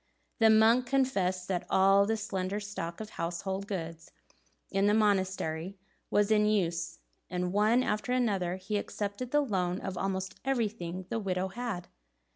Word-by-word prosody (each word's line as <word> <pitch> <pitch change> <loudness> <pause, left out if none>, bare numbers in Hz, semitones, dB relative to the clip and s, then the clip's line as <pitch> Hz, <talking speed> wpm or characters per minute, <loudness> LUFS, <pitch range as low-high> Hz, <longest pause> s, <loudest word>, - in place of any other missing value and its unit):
The 225 -1 +6
monk 225 +3 +5
confessed 195 -9 +1
that 180 -2 -1
all 195 +1 +5
the 225 +1 +1
slender 195 -1 -2
stock 200 -5 -5
of 215 -1 -7
household 190 +4 -3
goods 165 -4 -5 0.6
in 195 +1 +2
the 210 - +4
monastery 190 -4 0 0.3
was 205 +1 +2
in 210 -1 +4
use, 170 -5 0 0.3
and 180 0 -2
one 215 +5 +4
after 210 +1 -1
another 200 -8 +1
he 190 +3 -3
accepted 205 +4 -4
the 295 +3 +3
loan 185 -8 -1
of 190 -2 -5
almost 190 -1 -3
everything 210 -9 -2
the 230 - 0
widow 190 -2 -1
had. 215 -4 -4
195 Hz, 150 wpm, -30 LUFS, 180-215 Hz, 0.6 s, The